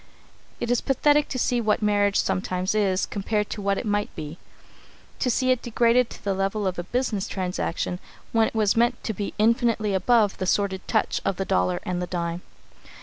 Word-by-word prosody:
It 235 - -2
is 245 - +2
pathetic 290 +2 +3
to - - -3
see 245 -1 +1
what 215 -1 +1
marriage 205 -1 +2
sometimes 185 +1 -1
is, 195 -3 +1
compared 210 +1 -2
with - - -8
what 200 -1 0
it - - -4
might 205 -1 0
be 155 +2 -7 0.8
to 250 - +1
see 255 +2 +2
it 255 -1 +1
degraded 240 +1 +2
to - - -12
the 200 - 0
level 195 +2 -1
of 185 -1 -1
a - - -2
business 220 -1 -1
transaction 180 -1 -3 0.3
when 225 -1 +3
it - - -8
was 215 -2 +2
meant 240 +2 +1
to 220 - -2
be 200 0 -5
infinitely 225 -1 +2
above 210 +1 +2
the 185 - -2
sordid 190 -1 0
touch - - 0
of 195 - 0
the 195 - -3
dollar 90 - +1
and 180 -1 -2
the 180 - -3
dime. 170 -1 -3
205 Hz, 200 wpm, -25 LUFS, 190-230 Hz, 0.8 s, pathetic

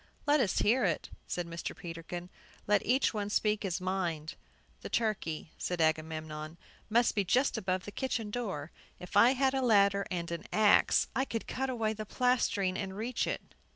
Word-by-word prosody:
"Let 295 0 +4
us 220 -8 +1
hear 245 +5 +3
it," 170 -6 -1 0.2
said 175 - -2
Mr. 170 0 -6
Peterkin. 175 +1 -7 0.3
"Let 205 -1 +3
each 255 +3 +2
one 205 -2 -2
speak 210 0 +1
his 185 -3 -2
mind." 175 -4 -2 0.5
"The - - -6
turkey," 200 -9 -1
said 180 -1 -2
Agamemnon, 155 0 -1 0.3
"must 235 +2 +3
be 205 - +1
just 250 +8 +2
above 185 -4 -1
the 205 - -6
kitchen 230 -3 -2
door. 195 -11 -4 0.3
If 180 - -9
I 230 +5 +7
had 265 0 +2
a 270 - +1
ladder 200 -4 +4
and 170 -2 -3
an 170 - -4
axe, 210 -1 +5
I 260 - +2
could 230 -4 -4
cut 265 +1 -2
away 225 -4 0
the 215 -1 -7
plastering 230 -7 +1
and 190 0 -4
reach 230 +3 -1
it." - - -5
200 Hz, 180 wpm, -31 LUFS, 175-235 Hz, 0.5 s, I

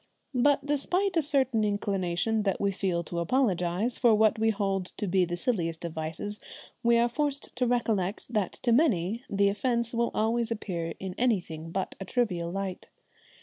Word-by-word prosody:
But 280 +2 +3
despite 355 +7 0
a 330 - +4
certain 265 -6 +1
inclination 205 0 0
that 195 -2 0
we 200 0 +1
feel 185 -3 -1
to 170 +1 -4
apologise 190 0 0
for 235 -3 +5
what 220 +1 +3
we 225 0 +3
hold 195 -3 -1
to - - -2
be 185 -1 +2
the 175 0 -4
silliest 170 -6 -1
of 170 - -4
vices, 160 +7 -4 0.4
we 235 0 +4
are 235 +1 +4
forced 285 +3 0
to 250 0 +1
recollect 225 -3 -1
that 205 -5 0
to 240 - -1
many 230 - +2
the 200 0 +3
offence 235 +3 0
will 235 0 +1
always 225 +1 +1
appear 180 -7 -3
in 190 -1 -5
anything 175 -10 0
but 190 +2 -3
a 195 - -5
trivial 185 -7 -1
light. 195 -1 -4
210 Hz, 175 wpm, -28 LUFS, 180-240 Hz, 0.4 s, for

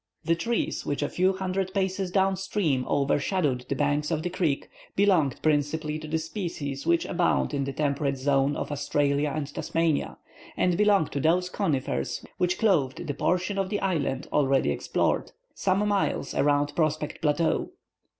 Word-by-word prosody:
The 165 - +3
trees 230 +8 -1
which, 145 0 -2
a 145 - -1
few 185 +2 +2
hundred 190 0 -2
paces 190 -1 0
down 190 +1 +2
stream 175 -9 -1
overshadowed 140 -1 +1
the - - 0
banks 145 +1 0
of 160 -2 -1
the 180 - -2
creek, 165 -6 0 0.3
belonged 180 -9 +3
principally 155 +1 0
to 155 - -8
the 160 +1 0
species 160 -5 -4
which 170 0 +3
abound 170 - +1
in 140 -1 0
the 140 - -3
temperate 140 -1 -1
zone 135 +1 +2
of - - -4
Australia 145 0 +1
or 150 - -4
of 145 -1 -4
Tasmania, 165 -3 0 0.4
and 180 -1 +2
belong 205 -3 +4
to 140 - -3
those 180 +5 +2
conifers 135 - -1
which 180 +1 +1
clothed 165 - +1
the 145 - -2
portion 185 +6 0
of 190 -1 -1
the 205 - -1
island 160 -8 -1
already 135 -2 +3
explored, - - -1 0.2
some 195 +2 +1
miles 200 -8 0
around 145 0 +2
Prospect 155 -2 -1
Plateau. 160 +1 +1
155 Hz, 165 wpm, -27 LUFS, 145-185 Hz, 0.4 s, belong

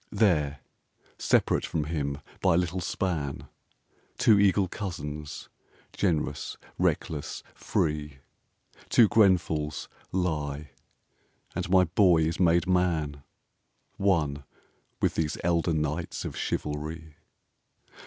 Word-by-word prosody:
There, 75 -10 +2 0.6
separate - - +2
from 80 - -1
him 75 -2 -3 0.2
by - - +3
a - - +4
little 90 +1 -1
span, 85 -6 -2 0.7
Two 105 -3 +5
eagle 100 -1 +4
cousins, 75 -7 -6 0.5
generous, 75 -6 -1 0.2
reckless, 75 -3 -1
free, 75 -2 -1 0.7
Two 115 - +6
Grenfells, 90 -8 +2 0.2
lie, 75 -5 -2 0.8
and - - -3
my 95 0 +6
Boy 90 -1 +4
is 80 +2 -1
made 85 -1 +4
man, 85 -6 +1 0.8
One 75 -8 +1 0.6
with - - +1
these 80 -2 -1
elder 85 0 +2
knights 80 +1 -2
of - - -5
chivalry. 75 +1 -4
80 Hz, 100 wpm, -28 LUFS, 75-90 Hz, 0.8 s, Two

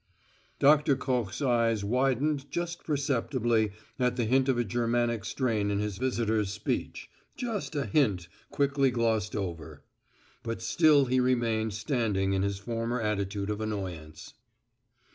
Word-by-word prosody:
Doctor 150 0 +5
Koch's 125 -2 -2
eyes 115 -4 +2
widened 135 +5 0
just 175 0 -4
perceptibly 125 -6 0 0.3
at 125 -1 +1
the 120 -2 0
hint 130 +3 +2
of 130 - +2
a 120 - +2
Germanic 120 0 0
strain 110 -3 -1
in 100 - 0
his 105 -1 -3
visitor's 110 -5 0
speech - - -3 0.3
just 225 -9 -4
a 140 -1 0
hint 105 - +1 0.2
quickly 140 -1 +2
glossed 115 -4 0
over. 85 -7 -5 0.6
But 115 0 -5
still 155 -4 +4
he 130 0 +1
remained 115 -4 +1
standing 105 -5 0
in 95 - +1
his 100 0 -1
former 115 +3 -3
attitude 100 -1 -2
of 105 +1 -3
annoyance. 95 -8 -5
115 Hz, 135 wpm, -29 LUFS, 105-135 Hz, 0.6 s, Doctor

